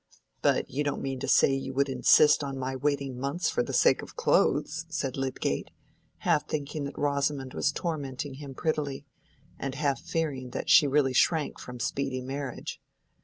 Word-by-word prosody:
"But - - +2
you 145 +3 -2
don't 145 - -2
mean 135 -1 -3
to - - -4
say 135 - +5
you 135 -1 -3
would 140 +1 +2
insist 150 +2 +5
on 135 -1 -4
my 130 0 -3
waiting 140 -2 -1
months 140 +6 -1
for - - +1
the 120 - -3
sake - - +4
of - - -11
clothes?" 155 +2 +1
said 145 -5 -2
Lydgate, 135 -1 -2 0.5
half - - +1
thinking 145 0 -3
that 140 - -7
Rosamond 140 -2 -1
was 150 - +1
tormenting 145 -4 -4
him 140 -2 -8
prettily, 145 -3 -2 0.5
and 135 -1 -4
half 140 -3 0
fearing 145 -6 -2
that - - -1
she 155 -5 +8
really 135 -1 +2
shrank 155 +3 +2
from 125 -1 -8
speedy 130 0 -2
marriage. 135 +1 -5
140 Hz, 170 wpm, -28 LUFS, 135-150 Hz, 0.5 s, she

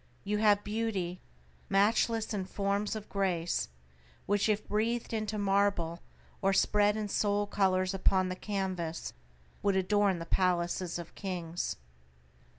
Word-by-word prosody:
You 210 +1 -1
have 205 -1 +4
beauty, 205 -5 -2 0.5
matchless 220 +3 +2
in 195 -3 -2
forms 200 +2 -1
of 215 -1 -6
grace, 180 - 0 0.6
which 205 +2 +2
if 210 0 0
breathed 230 +3 0
into 215 -1 -2
marble, 195 -4 +1 0.4
or 195 0 +3
spread 210 +2 +3
in 215 -1 -2
soul 205 0 +1
colors 185 -2 +1
upon 190 0 +2
the 185 - -3
canvass 185 -5 -3 0.5
would 200 -1 +2
adorn 195 0 +2
the 165 - -5
palaces 175 0 0
of 170 -1 -8
kings. 175 -3 -3
200 Hz, 130 wpm, -31 LUFS, 185-210 Hz, 0.6 s, have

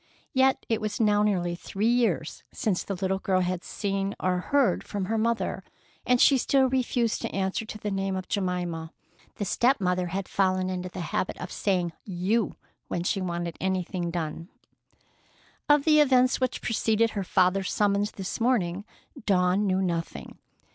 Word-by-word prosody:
Yet 265 0 +3
it 225 - 0
was 215 -1 -3
now 210 -2 +3
nearly 180 -5 +1
three 195 +4 -3
years 225 - +1
since 195 -5 -1
the 195 - -4
little 190 +1 -1
girl 185 -1 +1
had 180 0 -2
seen 195 -1 -2
or 180 -1 +1
heard 275 +7 +2
from 200 -2 -3
her 225 +4 -1
mother, 230 +1 -1 0.4
and 250 0 +4
she 270 0 +6
still 265 +1 +3
refused 250 -3 0
to - - -2
answer 195 +3 -1
to 215 - -6
the 210 -1 -4
name 195 0 -1
of 185 -1 -5
Jemima. 175 -4 -2 0.4
The 205 - -3
step 250 +8 +2
mother 180 -1 0
had 185 +2 -3
fallen 185 -1 +1
into 180 0 -4
the 180 - -6
habit - - -1
of 180 - -7
saying 180 -4 0
"you" 195 +3 -1 0.3
when 175 - -2
she 195 +2 0
wanted 175 -2 -3
anything 185 -2 -1
done. 165 0 -4 1.2
Of 295 -1 +5
the 305 -1 +6
events 255 -3 +4
which 255 - -1
preceded 225 0 +1
her 200 - -3
father's 185 +1 +2
summons 205 0 +1
this 195 +4 -5
morning, 205 -6 +1 0.4
Dawn 185 +1 +3
knew 190 0 +1
nothing. 165 - -4
195 Hz, 170 wpm, -27 LUFS, 180-220 Hz, 1.2 s, she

